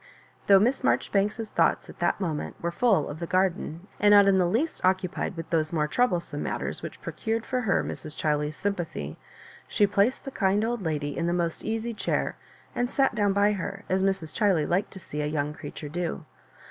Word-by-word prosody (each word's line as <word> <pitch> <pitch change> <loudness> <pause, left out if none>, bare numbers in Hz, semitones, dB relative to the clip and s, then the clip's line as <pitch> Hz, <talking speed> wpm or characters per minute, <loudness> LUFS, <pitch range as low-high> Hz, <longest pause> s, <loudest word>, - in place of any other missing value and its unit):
" - - -31
Though 195 - +8
Miss 240 +7 +2
Maijori - - +1
banks's 210 +2 0
thoughts - - +2
at - - -13
that - - +1
moment 165 -6 -3
were 170 - -2
full 210 +3 +2
of 145 +2 -7
the 170 - -4
garden, 185 -2 0
and 205 0 +6
not 200 -1 +8
in 190 -1 +5
the 180 - +3
least 240 - -1
occupied 185 -1 0
with 165 - -7
those 155 -2 +1
more 155 -3 +1
troublesome 175 -8 0
matters - - -3
which - - -7
procured 225 0 -2
for 255 -1 -1
her 205 -6 +1
Mrs. 155 -1 -6
Chiley's 150 0 0
sympathy, 165 - -3 0.5
she 205 - +3
placed 200 +5 +1
the 270 - -5
kind 200 -1 +2
old 240 -1 -2
lady 150 -4 -2
in 170 - -1
the 170 - +1
most 170 -2 -1
easy 225 +1 -2
chair, - - -1 0.4
and 245 0 0
sat 270 0 +2
down 205 -2 +2
by 200 +1 +3
her, 195 0 -4
as 190 +1 +2
Mrs. 190 -5 0
Chiley 195 -8 +2
liked 180 +4 +1
to 190 - -10
see 150 -4 -5
a - - -1
young 150 -1 -1
creature 150 - -8
do. 175 +2 -3
190 Hz, 210 wpm, -27 LUFS, 165-210 Hz, 0.5 s, Though